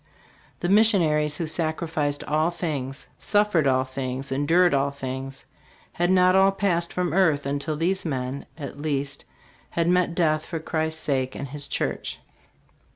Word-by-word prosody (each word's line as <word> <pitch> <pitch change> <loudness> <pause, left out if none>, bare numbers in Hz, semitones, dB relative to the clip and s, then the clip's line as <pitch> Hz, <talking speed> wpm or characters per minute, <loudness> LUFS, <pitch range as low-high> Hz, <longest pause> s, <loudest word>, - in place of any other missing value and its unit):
The 175 - 0
missionaries 170 -8 +3
who 170 - -2
sacrificed 155 -2 -1
all 155 +2 +1
things, 145 -6 -4
suffered 205 -8 +2
all 130 -1 +3
things, 130 0 -5
endured 165 +6 +3
all 140 0 +2
things, 135 -1 -6 0.5
had 175 +1 0
not 185 0 +5
all 195 +1 +5
passed 180 -4 0
from 180 -3 -1
earth 160 -7 +3
until 145 +2 -2
these 185 +4 0
men, 135 -3 -3
at 145 -1 -7
least, 140 -2 -2 0.4
had 170 0 0
met 180 -1 +2
death 155 -3 +2
for 170 - -5
Christ's 160 0 -2
sake 130 -2 0
and 140 - -5
his 145 +1 -5
church. - - -3
155 Hz, 150 wpm, -25 LUFS, 140-175 Hz, 0.5 s, not